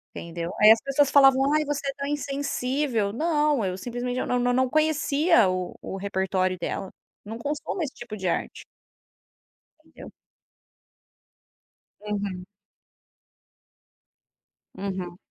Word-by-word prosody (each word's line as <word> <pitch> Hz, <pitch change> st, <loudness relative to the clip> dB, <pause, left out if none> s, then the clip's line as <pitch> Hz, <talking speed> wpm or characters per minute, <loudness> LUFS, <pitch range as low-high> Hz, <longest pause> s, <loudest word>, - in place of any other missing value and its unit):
Entendeu? 170 Hz, 0 st, -5 dB
Aí 215 Hz, -, +9 dB
as 225 Hz, -, +6 dB
pessoas 275 Hz, 0 st, +2 dB
falavam: 270 Hz, 0 st, +5 dB
"Ai, 305 Hz, 0 st, +2 dB
você 285 Hz, -1 st, -3 dB
é -, -, -3 dB
tão 280 Hz, 0 st, -3 dB
insensível", 275 Hz, -5 st, -1 dB
não, 300 Hz, -2 st, +1 dB
eu 185 Hz, -1 st, -2 dB
simplesmente 245 Hz, +3 st, -4 dB
eu -, -, -1 dB
não 250 Hz, -, 0 dB
não 245 Hz, 0 st, +1 dB
não 260 Hz, 0 st, +2 dB
conhecia 305 Hz, -, +3 dB
o 185 Hz, -1 st, -3 dB
o 195 Hz, -, -6 dB
repertório 190 Hz, -1 st, -1 dB
dela, 185 Hz, +2 st, -4 dB, 0.4 s
não 225 Hz, +2 st, -6 dB
consumo 295 Hz, +7 st, -3 dB
esse 275 Hz, -, -5 dB
tipo 240 Hz, -3 st, -8 dB
de 190 Hz, -3 st, -7 dB
arte. 170 Hz, -, -3 dB, 1.2 s
Entendeu. 320 Hz, -, -13 dB, 1.9 s
Uhum. 200 Hz, -3 st, -4 dB, 2.3 s
Uhum. 185 Hz, -3 st, -5 dB
245 Hz, 120 wpm, -25 LUFS, 195-285 Hz, 2.3 s, Aí